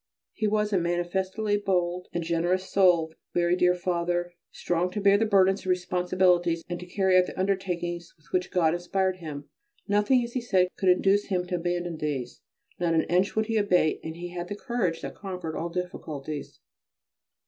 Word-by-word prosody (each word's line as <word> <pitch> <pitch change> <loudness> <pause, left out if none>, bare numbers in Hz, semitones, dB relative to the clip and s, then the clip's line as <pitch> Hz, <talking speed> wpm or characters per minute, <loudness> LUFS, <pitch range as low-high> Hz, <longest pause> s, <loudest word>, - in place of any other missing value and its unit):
His 215 -1 0
was 210 0 0
a 190 - +4
manifestly 190 +5 -1
bold 180 -3 -1
and 175 - -2
generous 175 +3 0
soul, 175 -5 +3 0.2
very 175 0 +3
dear 180 0 +3
Father, 175 0 -1 0.2
strong 175 +1 -1
to 210 - -4
bear 200 +1 +4
burdens 195 -2 +4
and 185 - -6
responsibilities 180 -1 +2
and 175 -1 -4
to 180 - -9
carry 190 0 +3
out 180 - +2
the - - -8
undertakings 175 -3 -2
with 155 - -29
which 180 -1 0
God 165 -3 +2
inspired 185 +2 -1
him. 150 -4 -7 0.4
Nothing, 210 +5 +3
as 235 0 -6
he 255 - -1
said, 190 -6 +2
could 190 - +1
induce 195 +3 +3
him 180 -2 -1
to 180 0 -2
abandon 175 -1 -2
these; 140 -5 -4 0.4
not 170 -2 +1
an 160 - +3
inch 185 +3 +2
would 220 0 +2
he 225 0 -1
abate, 180 -6 +2
and 160 0 -6
he 175 +1 -6
had 175 0 -6
a 205 - -3
courage 205 -7 -2
that - - -5
conquered 180 -5 -6
all 170 - -3
difficulties. 155 -5 -5
180 Hz, 180 wpm, -27 LUFS, 175-195 Hz, 0.4 s, a